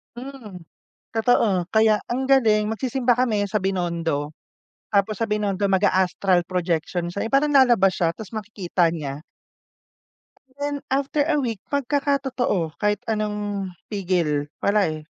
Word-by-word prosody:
Mm. 240 -8 -9 0.5
Totoo, 220 -5 +2
kaya 220 -1 +3
ang 260 +2 -1
galing 220 -6 +4
magsisimba 245 +2 +1
kami 220 -5 +1
sa 210 +1 0
Binondo, 170 -5 -2 0.6
tapos 205 0 +1
sa 225 - +1
Binondo 205 -2 0
mag-a-astral 190 -1 +2
projection 175 -1 -1
siya, 200 - -4
'yung 230 - -13
parang 290 +2 +2
lalabas 240 -9 +5
siya 170 - +1
ta's 215 -3 -9
makikita 195 -5 -1
niya. 145 -3 -5 1.3
Then 285 0 -3
after 280 +2 0
a 320 - +2
week, 225 -5 -3
magkakatotoo 270 - -1
kahit 210 0 0
anong 210 -2 -2 0.2
pigil. 175 -7 0 0.2
Wala, 205 0 +3
eh. 155 -1 -5
210 Hz, 125 wpm, -23 LUFS, 180-245 Hz, 1.3 s, lalabas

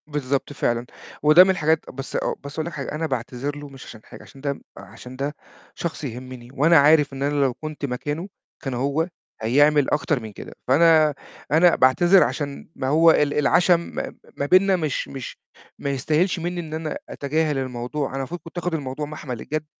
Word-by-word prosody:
بالضبط، 140 -1 -2
فعلًا، 120 -3 -1 0.4
وده 155 +4 +9
من 190 - 0
الحاجات 160 -4 +1
بس 135 +1 -7
أ - - +2 0.2
بس 140 0 -8
هاقول 160 0 -3
لك 170 - -5
حاجة، 140 -2 -5
أنا 160 +1 -2
باعتذر 130 +2 -3
له 145 0 -9
مش 135 -1 -12
عشان 110 - -11
حاجة - - -13
عشان 135 - -15
ده 140 0 -1
م - - -15 0.2
عشان 125 +1 -11
ده 140 +3 -3 0.4
شخص 170 -2 -4
يهمّني 125 -1 -7
وأنا 160 +5 +5
عارف 145 0 +5
إن 135 0 -4
أنا 145 0 +1
لو 135 -2 +2
كنت 155 +1 -6
مكانه 145 +7 -4 0.4
كان 135 - -3
هو 140 +6 0 0.3
هيعمل 145 +5 +4
أكتر 150 -1 +1
من 110 -2 -8
كده، - - -10
فأنا 155 +2 +5 0.4
أنا 165 +3 +5
باعتذر 175 +9 +5
عشان 140 -2 -4
ما 130 - -3
هو 160 +4 +6
ال 145 -2 +2
العَشَم 170 +4 +4
ما 170 - -5
م - - -19 0.2
ما 140 - -1
بيننا 185 +5 +5
مش 155 -6 -2
مش 135 -3 -7 0.4
ما 140 - -3
يستاهلش 155 +7 +1
منّي 175 +1 -3
إن 155 -2 -9
أنا 155 -1 -3
أتجاهل 150 +1 -1
الموضوع، 130 +2 -3
أنا 135 - -5
المفروض 145 +6 -4
كنت 165 +2 -12
آخُد 175 0 -2
الموضوع 145 -1 -3
مَحمَل 145 -6 -7
الجَد، 155 0 -3
145 Hz, 195 wpm, -23 LUFS, 135-160 Hz, 0.4 s, وده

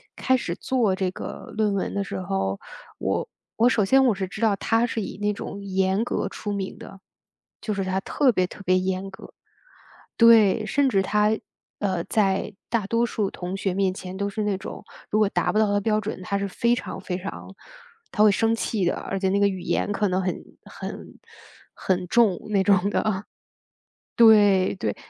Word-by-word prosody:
开 260 0 +2
始 175 -7 -4
做 225 -5 0
这 190 -1 -1
个 - - -8
论 210 -2 +2
文 195 - -2
的 200 - -1
时 - - -5
候， 95 - -2 0.4
我 - - -1 0.3
我 235 +2 +5
首 215 -5 +2
先 265 +6 +4
我 225 -5 +3
是 190 -1 -3
知 210 - -8
道 215 -3 +3
他 225 +4 +1
是 230 -2 -3
以 190 - -6
那 210 0 0
种 200 0 -7
严 190 +2 +1
格 - - -2
出 205 -1 -5
名 195 -1 -4
的， 195 - -12 0.6
就 215 - -2
是 195 -1 -2
他 190 0 0
特 260 +5 +2
别 185 -4 +1
特 205 - -12
别 185 +1 +3
严 185 +1 -2
格。 190 - -13 0.8
对， 225 -3 +6
甚 275 +3 +2
至 195 -5 +2
他， 210 +2 +2 0.4
呃， 185 -4 0
在 200 -1 0 0.2
大 225 -4 0
多 230 +3 +1
数 210 -4 -1
同 180 +1 -6
学 190 -2 -2
面 195 -1 +1
前 185 0 -8
都 200 +1 -2
是 215 +1 -3
那 200 -2 0
种， 195 - -8 0.3
如 215 - +1
果 210 -2 +4
达 - - 0
不 215 - +1
到 215 - +4
他 205 0 +2
标 215 +1 +1
准， 205 -3 -5
他 200 +2 -2
是 200 0 -2
非 235 +5 +1
常 - - -6
非 180 -1 -4
常 195 0 -8 0.6
他 210 - +1
会 210 - +7
生 225 +3 +2
气 210 -4 -1
的， - - +1
而 195 - -4
且 190 - +1
那 200 - +2
个 200 - +5
语 190 -2 -4
言 205 +3 -1
可 205 0 0
能 185 +1 0
很 180 - -1 0.3
很 - - -9 0.6
很 185 -1 -1
重 220 -5 +3
那 195 -2 +3
种 200 -1 +3
的。 205 -2 -1 0.9
对 205 -5 +6
对。 105 - -2
200 Hz, 215 characters per minute, -24 LUFS, 190-215 Hz, 0.9 s, 会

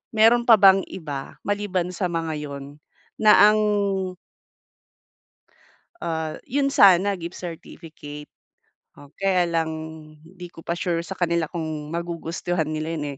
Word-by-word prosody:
meron 230 +2 +5
pa 230 - +9
bang 195 0 +7
iba 145 -7 -7
maliban 205 -3 -1
sa 185 +1 -3
mga 165 -1 -2
'yun 140 -2 -7 0.5
na 210 -1 +7
ang 215 - +1 2.4
Ah, 160 - -4
yon 275 +2 0
sana 200 -5 +5
gift 170 0 -7
certificate 155 -3 -9 0.7
o 145 0 -15
kaya 190 -2 +2
lang 165 -2 -1 0.5
hindi 180 +1 -11
ko 165 -1 -15
pa 170 - -2
sure 170 -2 -2
sa 195 - -7
kanila 170 -2 0
kung 155 -3 -5
magugustuhan 170 0 -3
nila 155 +1 -4
'yon, 150 - -4
170 Hz, 130 wpm, -23 LUFS, 160-190 Hz, 2.4 s, pa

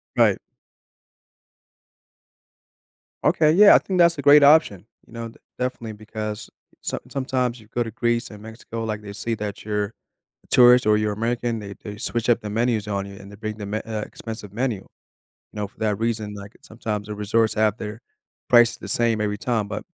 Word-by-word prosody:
Right. - - +4 2.9
Okay. 155 -1 +4
Yeah. 200 +5 +8
I - - +7
think 190 - -3
that's 170 -2 +5
a - - -3
great 145 +1 +7
option, 140 - +5 0.2
you - - -20
know? 115 0 -6
D - - -18 0.2
definitely 125 -3 -3
because 110 0 -6 0.3
some - - -3
sometimes 130 -3 -1
you 110 - -17
go 120 - 0
to 115 - -1
Greece 120 +1 -1
and 105 -1 -12
Mexico, 115 0 -7
like, 110 -1 -3
they 100 -1 -9
see 115 +2 -3
that 105 -2 -6
you're 105 -1 0 0.6
a - - -24
tourist 125 -1 +6
or 105 0 +5
you're 105 0 0
American, 115 +2 -2
they 100 -2 -8
they 105 -1 -7
switch 120 +2 -1
up 120 - +3
the 105 - -6
menus 110 -1 0
on 100 -1 -2
you 100 - -10
and 100 - -12
they 100 - -12
bring 110 0 -5
the 105 - -6
me 105 +2 -2
uh, 110 -1 -3
expensive 105 -1 -8
menu. 120 -1 -1
You - - -16 0.7
know, 105 -1 -2
for - - -27
that 105 -2 0
reason, 110 -2 -2
like, 100 +1 -10
sometimes 105 -2 -5
the 105 - -5
resorts 110 +2 +1
have 110 -1 +2
their 105 +1 -7 0.5
prices 120 -1 +5
the - - -10
same 115 -2 +2
every 105 -1 -1
time. 115 -3 -1
But, 105 - -5
110 Hz, 195 wpm, -23 LUFS, 105-120 Hz, 2.9 s, Yeah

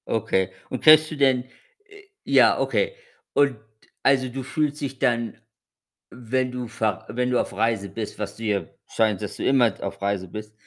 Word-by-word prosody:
Okay. 95 -4 0 0.2
Und 130 - -5
kennst 155 0 +7
du - - -4
denn 130 -3 +3 0.4
äh, 410 0 -16 0.2
ja, - - +4
okay. 485 -1 0 0.4
Und, 140 -4 +3 0.5
also, 130 -1 +3
du 130 +2 -5
fühlst 145 +4 -2
dich 135 -2 -4
dann, 120 -1 0 0.7
wenn 125 +1 -2
du 125 -1 -5
ver 110 -3 -2
wenn 125 +1 -1
du 125 - +3
auf - - -3
Reise 110 -3 0
bist, 110 0 -6
was 105 -2 -4
du 115 - -10
ja 100 -5 0 0.2
scheint, 110 -3 +1
dass 105 - -5
du - - -4
immer 130 -4 +4
auf 100 0 -5
Reise 100 -2 -1
bist. 105 +3 -8
120 Hz, 180 wpm, -24 LUFS, 105-135 Hz, 0.7 s, kennst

